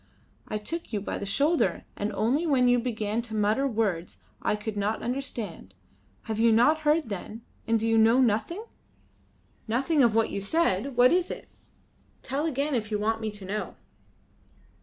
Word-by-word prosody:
I 215 - -2
took 330 +11 -6
you 210 - -1
by 200 - -4
the 200 - -5
shoulder 290 - +1 0.2
only 220 - 0
when 260 -4 +3
you 245 0 +4
began 220 -2 -2
to 230 -2 -7
mutter 215 +6 +2
words 205 -8 -1 0.2
I - - +1
could 210 0 -5
not 205 +2 -1
understand. 235 - -5 0.5
Have 220 -1 -4
you 230 0 +5
not 245 +8 +4
heard, 305 -3 +1
then, 210 +3 -6 0.2
and 225 0 +2
do 225 - -1
you 225 0 +4
know 225 +3 +5
nothing?" 255 - +1 1.0
"Nothing 270 +7 +2
of 235 -4 +4
what 225 -1 +2
you 200 - -3
said. 245 - 0
What 250 +3 +6
is 360 0 +1
it? - - -7 0.7
Tell 285 +4 -1
again 290 0 -1
if 220 -4 -1
you 210 - 0
want 220 +2 -1
me 220 - -2
to 205 -2 -9
know." 210 +3 -4
225 Hz, 175 wpm, -27 LUFS, 210-270 Hz, 1.0 s, What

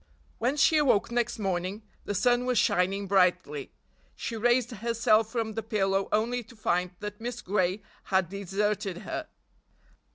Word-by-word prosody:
When 255 +5 0
she 315 +2 +5
awoke 260 -8 +3
next 240 0 0
morning 190 +1 -2 0.2
the 205 - -2
sun 245 +5 +2
was 250 -1 +1
shining 195 +2 +2
brightly. 180 -7 +1 0.5
She 230 - -4
raised 240 +2 +2
herself 225 -1 +2
from 225 -2 -2
the 225 - -3
pillow 195 -3 0
only 235 +3 +1
to 235 +1 -16
find 180 -4 0
that 210 +1 -6
Miss 240 0 -5
Gray 190 0 0 0.2
had 190 -2 +2
deserted 200 0 -2
her. 310 +10 -4
210 Hz, 150 wpm, -28 LUFS, 190-235 Hz, 0.5 s, she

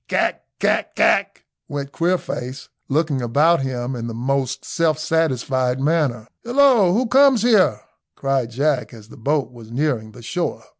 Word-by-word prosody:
"Kack, - - 0 0.2
kack, - - 0
kack," - - +1 0.2
went 140 -1 -5
Queerface, 140 -7 -3 0.2
looking 145 -2 0
about 145 +7 +3
him 130 -1 -3
in 115 -1 -5
the 115 - -6
most 135 +2 -2
self 160 -3 0
satisfied 130 -5 0
manner. 135 -6 0 0.2
"Hillo, 240 -6 +4
who 235 +8 +1
comes 260 -1 +4
here?" 205 - +4 0.4
cried 135 -3 -1
Jack, 130 0 -1
as 110 -1 -14
the - - -14
boat 140 +3 -1
was 115 -3 -13
nearing 120 -5 -2
the 120 - -13
shore. 170 +10 -3
135 Hz, 150 wpm, -21 LUFS, 125-165 Hz, 0.4 s, Hillo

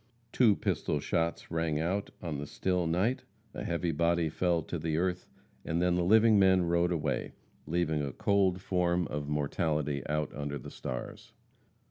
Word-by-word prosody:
Two 115 -5 +4
pistol 75 - -1
shots 85 +3 -2
rang 80 -2 0
out 95 +5 -1
on 80 -5 -3
the 75 - -5
still 90 0 -1
night, 105 +11 0 0.3
a - - -5
heavy 85 0 -1
body 85 +1 +1
fell 85 0 0
to 85 - -4
the 80 0 -1
earth, 90 +1 -1 0.4
and 80 +1 -1
then 90 0 +2
the 90 0 +1
living 110 +3 +5
men 95 -2 +5
rode 85 +1 +2
away, 85 -3 -2 0.3
leaving 80 -2 0
a 70 -1 -3
cold 95 +2 +1
form 90 -2 +1
of 75 0 -4
mortality 75 -1 -1
out 75 -1 -1
under 70 0 -3
the - - -9
stars. 60 -1 -7
85 Hz, 165 wpm, -30 LUFS, 75-90 Hz, 0.4 s, living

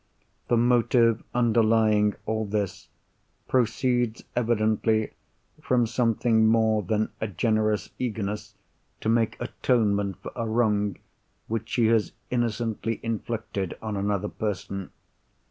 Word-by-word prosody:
The 120 - +3
motive 120 -1 +3
underlying 110 -3 +3
all 110 0 -1
this 100 -2 -3 0.6
proceeds 125 -2 +1
evidently 110 -2 +1 0.5
from 125 -2 +2
something 115 -1 +2
more 110 -1 +3
than 110 +3 -1
a 110 - 0
generous 110 +2 0
eagerness 105 -4 -3 0.5
to - - -1
make 115 -1 +2
atonement 105 -6 0
for - - -6
a 115 -2 -2
wrong 105 -3 +1 0.5
which 115 0 -3
she 120 - +2
has 115 -2 +2 0.2
innocently 115 -2 -1
inflicted 110 -4 -3
on 110 -2 -4
another 100 0 -1
person. 100 -2 -4
110 Hz, 110 wpm, -26 LUFS, 105-115 Hz, 0.6 s, The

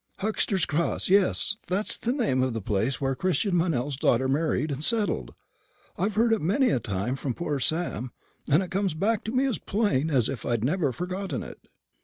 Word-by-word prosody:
Huxter's 200 -2 0
Cross; 165 +4 0
yes, 200 +1 +3
that's 195 +4 0
the 235 - -2
name 225 - +1
of 130 -1 0
the 115 - -2
place 110 +5 -1
where 135 -1 0
Christian 185 - 0
Meynell's 145 -6 0
daughter 130 -1 +2
married 150 +2 0
and 140 +2 -3
settled. 205 - 0 0.6
I've 200 +3 -1
heard 225 +1 +3
it 220 - 0
many 230 - +2
a - - +2
time 105 +4 -2
from 135 -2 -3
poor 150 -5 -2
Sam, 155 -5 -1 0.4
and 150 +7 +4
it 180 - -8
comes 190 -3 0
back 210 +6 0
to 220 - -2
me 255 +2 +2
as 260 -5 -1
plain 195 - 0
as 130 -6 +2
if 135 -6 -5
I'd 120 -2 -1
never 150 +1 +1
forgotten 180 - -4
it." - - -12
165 Hz, 195 wpm, -26 LUFS, 130-200 Hz, 0.6 s, and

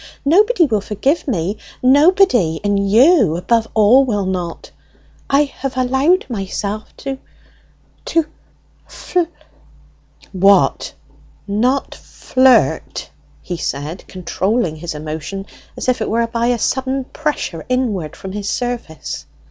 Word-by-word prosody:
Nobody 390 - +4
will 220 -7 0
forgive 265 - -1
me, 200 -3 -1 0.3
nobody! 265 - +4
and 200 -1 +1
you 235 - +5
above 225 +5 +1
all 220 +5 +6
will 205 -6 -1
not!... 180 -3 -4 0.6
I 280 +2 +4
have 270 -2 -6
allowed 265 +9 +2
myself 205 -1 -4 0.2
to 270 -1 -3 0.9
to 330 -2 +1 0.6
fl 360 - -3 0.6
" - - -29 0.2
"What, 200 -1 +3 0.5
not 245 +7 0
flirt!" 260 0 +1 0.3
he 175 - -4
said, 150 +4 -4
controlling 185 -1 -1
his 165 0 -6
emotion 155 +6 -5 0.3
as - - -4
it 245 -3 0
were 230 +2 +1
by 230 0 -1
a 245 -1 +2
sudden 265 +3 -1
pressure 280 - -3
inward 220 - -1
from 190 - -8
his 205 0 -4
surface. 200 - -4
230 Hz, 115 wpm, -18 LUFS, 190-265 Hz, 0.9 s, all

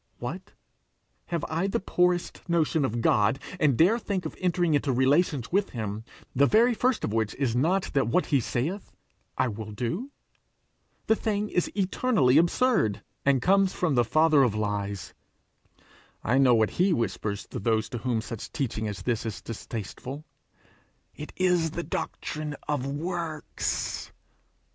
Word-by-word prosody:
What! - - -6 0.7
have 170 -2 -2
I 165 +4 -1
the 195 - 0
poorest 180 -1 0
notion 160 -3 +2
of 115 - -2
a - - -2
God, 110 0 +3 0.2
and 145 -7 +3
dare 200 - +4
think 200 -5 -3
of - - -5
entering 175 -3 +1
into 145 -1 +1
relations 135 +1 +2
with 195 +2 +2
him, 110 0 -4 0.3
the 140 +2 +5
very 235 - +4
first 250 +1 +1
of 105 - -1
which 110 -2 0
is 130 -4 0
not 175 +9 +1
that 135 -5 +2
what 180 +10 +2
he 140 - +2
saith, 150 - -3 0.4
I 130 - +2
will 110 -1 -6
do? 125 - -3 1.0
The 220 - +4
thing 210 -1 -1
is 180 - 0
eternally 190 - +3
absurd, 170 - +2 0.2
and 135 -3 +3
comes 195 -1 +2
of 165 -5 +3
the 120 -2 +4
father 155 +5 +4
of 120 -6 +2
lies. 100 -2 -3 1.1
I 125 +4 +2
know 130 -3 +6
what 110 -1 +2
he 185 0 +4
whispers 105 -6 -2
to - - -5
those 110 0 +1
to 120 - -4
whom 115 -1 -1
such 115 -1 -7
teaching 125 -8 -2
as 100 -3 -5
this 115 -1 -1
is 110 -3 -4
distasteful: 120 +6 -7 0.9
'It 150 - -8
is 180 -3 +2
the 170 +2 -4
doctrine 155 -3 -4
of 145 -3 -1
works!' 160 +1 -3
145 Hz, 160 wpm, -27 LUFS, 115-180 Hz, 1.1 s, know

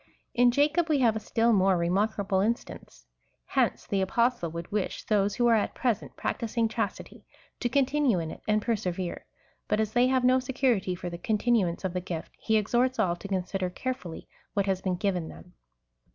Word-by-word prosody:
In 245 0 +5
Jacob 300 +6 +2
we 305 - +3
have 230 -3 +4
a - - -1
still 230 +2 +2
more 190 -2 +4
remarkable 195 +3 0
instance. 195 - -3 0.4
Hence - - 0
the 195 -1 0
Apostle 235 -2 +1
would 170 +1 -7
wish 205 -2 -2
those 205 -1 +1
who 240 - +1
are 235 - +5
at 220 - +1
present 235 -5 -1
practising 230 0 -1
chastity, 220 - -4 0.4
to 240 - 0
continue 275 -3 +2
in 165 -2 -3
it - - -10
and 215 0 +2
persevere; 190 -6 -2 0.4
but 210 - +1
as 220 -1 -1
they 245 +1 +4
have 260 -1 +2
no 255 +1 +5
security 250 -8 0
for 175 0 -6
the 170 - -7
continuance 215 -4 +1
of 185 - -2
the 180 - -2
gift, 170 -2 -6
he 220 -1 +2
exhorts 245 +5 +1
all 185 -6 +2
to 200 - -8
consider 190 -1 -2
carefully 180 -5 -5 0.3
what 200 -1 +2
has 190 -2 0
been 185 -2 -1
given 180 -3 -1
them. 180 - -13
210 Hz, 185 wpm, -28 LUFS, 185-240 Hz, 0.4 s, In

